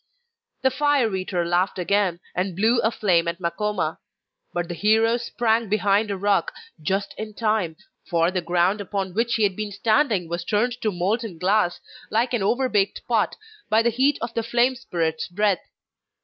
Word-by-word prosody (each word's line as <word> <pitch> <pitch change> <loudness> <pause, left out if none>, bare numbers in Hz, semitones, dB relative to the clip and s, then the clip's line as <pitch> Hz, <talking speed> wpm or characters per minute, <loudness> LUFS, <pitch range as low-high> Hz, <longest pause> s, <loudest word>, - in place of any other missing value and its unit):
The 265 - +4
fire 270 -6 +2
eater 185 -2 -2
laughed 175 +3 +1
again, 185 -1 +1
and 180 0 -2
blew 225 +5 +3
a 220 - +2
flame 180 -7 +1
at 170 +1 -2
Makoma. 180 -2 -2 0.5
But 175 -1 -2
the 175 - -4
hero 220 +5 +3
sprang 230 -2 0
behind 205 +1 +2
a 200 - -2
rock 200 -2 +1 0.3
just 195 +5 -1
in 215 -1 -6
time, 215 -7 0 0.3
for 170 -1 +2
the 185 -1 -1
ground 175 +4 +1
upon 195 -2 -3
which 230 +3 +1
he 220 - +1
had 195 -2 +2
been 210 0 -4
standing 215 - +1
was 170 +1 -3
turned 235 +6 0
to 215 - 0
molten 195 +2 -2
glass, 180 0 +1 0.3
like 235 +3 +1
an 240 - +1
overbaked 210 -2 +1
pot, 225 -3 +1 0.3
by 220 +1 +4
the 235 - +2
heat 265 +5 +2
of 235 0 -4
the 230 - 0
flame 240 +3 +2
spirit's 165 -9 -2
breath. 200 0 +1
205 Hz, 175 wpm, -23 LUFS, 180-225 Hz, 0.5 s, The